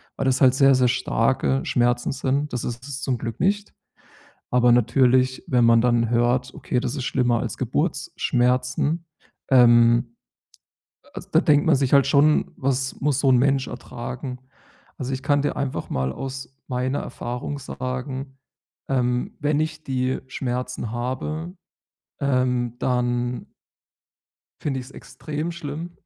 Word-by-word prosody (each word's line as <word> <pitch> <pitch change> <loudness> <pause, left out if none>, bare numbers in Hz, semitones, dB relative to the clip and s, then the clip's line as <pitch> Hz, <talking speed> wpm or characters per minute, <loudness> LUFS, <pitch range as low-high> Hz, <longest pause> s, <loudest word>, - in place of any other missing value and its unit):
weil 135 - -3
das 130 -1 +1
halt 130 -2 +6
sehr, 135 0 +5
sehr 125 -1 +3
starke 130 +2 +1
Schmerzen 120 0 +1
sind. 140 +1 -1
Das 125 - -2
ist 120 0 -5
es 135 -1 -6
zum 130 -2 -1
Glück 115 -1 -6
nicht. 205 +2 0 0.8
Aber 125 -1 +4
natürlich, 125 +2 +3
wenn 125 -2 +3
man 115 0 +6
dann 120 -2 +2
hört: 120 +1 +1
„Okay, 125 - -2
das 125 +1 -3
ist 135 - -4
schlimmer 125 -3 +1
als - - -4
Geburtsschmerzen.“ 125 +6 0 0.5
Ähm, 120 -1 +5 0.9
a - - -22
also, - - -9
da - - +5
denkt 145 -1 +3
man 160 - +5
sich 135 0 0
halt 140 -1 +6
schon, 150 +2 +3
was 135 0 -1
muss 140 -1 +1
so 140 - +3
'n 125 - +5
Mensch 135 +1 +2
ertragen? 125 +1 -7 0.6
Also, 135 0 -4
ich 130 +1 -4
kann 145 -1 +2
dir 145 - -1
einfach 140 -2 -3
mal 65 0 -1
aus 135 - -7
meiner 130 +2 -1
Erfahrung 125 +4 -5
sagen, 130 +1 -5 0.5
ähm, 125 -2 0
wenn 150 0 +1
ich 155 0 -3
die 130 -1 -1
Schmerzen 125 -3 -4
habe, 130 +8 -4 0.7
ähm 125 -3 0
dann 120 -1 -1 1.1
Finde 135 -3 -2
ich's 130 +1 -10
extrem 150 +6 -6
schlimm. 165 +1 -7
130 Hz, 145 wpm, -23 LUFS, 125-140 Hz, 1.1 s, halt